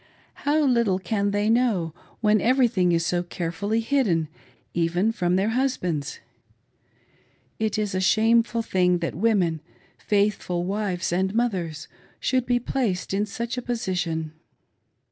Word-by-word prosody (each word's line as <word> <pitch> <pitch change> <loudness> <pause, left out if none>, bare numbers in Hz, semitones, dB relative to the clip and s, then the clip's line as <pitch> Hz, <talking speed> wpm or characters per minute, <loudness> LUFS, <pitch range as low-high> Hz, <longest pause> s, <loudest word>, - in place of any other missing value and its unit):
How 310 +1 +3
little 235 -8 +2
can 200 +2 -1
they 205 +1 0
know, 220 -9 +2 0.3
when 215 -1 +3
everything 235 -8 +3
is 165 -1 +1
so 175 +1 +1
carefully 180 +5 -2
hidden, 215 - +1 0.4
even 175 +5 +1
from 180 -5 0
their 195 +3 +1
husbands. 180 - -1 1.4
It 220 -1 0
is 210 -2 -1
a 185 - 0
shameful 230 +3 +3
thing 180 -4 +2
that 170 -1 -3
women 180 -5 +1 0.2
— - - -30
faithful 200 -4 0
wives 190 -2 -2
and 190 +3 0
mothers 175 -10 -1 0.2
— - - -31
should 255 -1 0
be 245 -1 +3
placed 230 -7 -2
in 205 +2 0
such 235 +4 -4
a - - -6
position. 180 -9 -2
200 Hz, 140 wpm, -24 LUFS, 175-230 Hz, 1.4 s, How